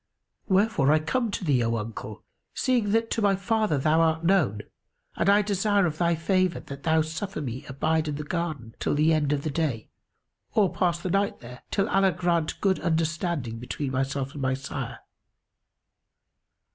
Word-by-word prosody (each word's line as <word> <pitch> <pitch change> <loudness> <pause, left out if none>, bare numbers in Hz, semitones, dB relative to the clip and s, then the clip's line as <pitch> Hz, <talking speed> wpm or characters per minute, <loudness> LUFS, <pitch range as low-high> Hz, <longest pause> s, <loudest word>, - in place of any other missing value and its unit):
Wherefore 190 - +3
I 155 - +5
come 230 +10 -1
to 200 - -4
thee, 130 -6 +3
O 115 0 0
uncle, 110 -1 -7 0.3
seeing 245 -5 +1
that 225 +2 +1
to 225 - 0
my 200 -1 +3
father 210 -3 0
thou 155 +4 +2
art 160 0 +2
known, 155 - +2 0.5
and - - +1
I 205 +1 +5
desire 200 0 +2
of 155 -2 -3
thy 170 -1 +2
favour 185 +2 +1
that 140 0 -9
thou 160 0 +3
suffer 165 +4 -5
me 130 -1 -5
abide 155 +3 0
in 150 - -2
the 150 - -4
garden 150 -8 -4
till - - 0
the 155 +2 +3
end 150 -2 +1
of 145 -1 0
the 155 - -2
day, 140 -8 -2 0.7
or 205 -5 +3
pass 175 -2 +1
the 180 0 -3
night 200 +1 0
there, 125 +1 -11
till 195 0 +1
Allah 195 -3 +3
grant 170 -3 0
good 190 -2 +2
understanding 160 -6 -1
between 130 +3 -4
myself 135 +1 -2
and 145 - -6
my 130 0 +1
sire." 135 0 -6
160 Hz, 180 wpm, -26 LUFS, 140-190 Hz, 0.7 s, I